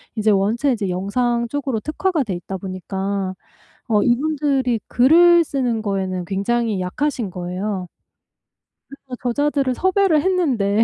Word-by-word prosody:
이제 215 0 +2
원체 220 +8 +2
이제 205 -5 -2
영상 235 +6 0
쪽으로 270 -3 -2
특화가 315 - -1
돼 200 -6 -4
있다 185 +2 -5
보니까 190 +1 -4 0.5
어 210 -3 +3
이분들이 270 -2 +1
글을 340 +7 +6
쓰는 245 -7 -1
거에는 190 -3 -2
굉장히 205 +1 -1
약하신 235 +3 -2
거예요. 180 +2 -4 1.0
그래서 270 -2 -10
저자들을 275 +1 0
섭외를 375 -2 +2
했는데 250 - +2
235 Hz, 300 characters per minute, -20 LUFS, 195-285 Hz, 1.0 s, 글을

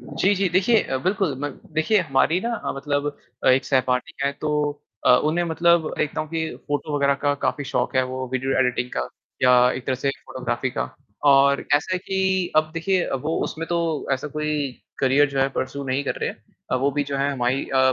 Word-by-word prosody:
जी, 200 +2 +1
जी, 195 -1 +1
देखिए 195 +6 +3
अ, 135 - -2
बिल्कुल 190 -5 +1
म 145 - -1 0.3
देखिए 175 +7 +3
हमारी 165 +3 +2
ना 235 - -2
हाँ, - - -1
मतलब 145 +1 -1 0.4
अ, - - +5
एक 130 +1 +4
सहपाठी 130 +3 0
है 140 - +1
तो 155 - -1 0.6
अ, - - +7
उन्हें 165 +3 +1
मतलब 170 0 +3
देखता 150 - -1
हूँ 155 - -5
कि 160 0 -2 0.2
फोटो 145 +1 -1
वगैरह 140 -1 +3
का 145 0 +3
काफ़ी 145 - 0
शौक - - -1
है, 130 - +5
वो 130 0 -5
वीडियो 130 +1 0
एडिटिंग 125 -1 +1
का, 60 - -1 0.3
या 125 -1 +6
एक 130 - -6
तरह 130 - +1
से 135 +2 -1 0.2
फ़ोटोग्राफी 130 0 -2
का - - -3 0.4
और 140 0 +4
ऐसा 150 +6 +1
है - - 0
कि 190 -1 0
अब 155 0 +3
देखिए 180 +2 +1
अ, - - -3
वो 150 +5 -2
उसमें 165 +1 -5
तो 170 -3 -1
ऐसा 135 +3 -2
कोई 150 -1 -2 0.3
करियर 140 +2 +4
जो 135 -1 -1
है 135 - +3
परस्यू 140 +2 -3
नहीं 135 +1 0
कर - - -1
रहे - - 0
हैं। - - -12 0.4
अ, - - +4
वो 135 +2 +1
भी 145 +1 -1
जो 140 0 -3
है 140 +1 +1
हमाई 130 0 0
अ, 130 0 +5
145 Hz, 220 wpm, -23 LUFS, 130-165 Hz, 0.6 s, अ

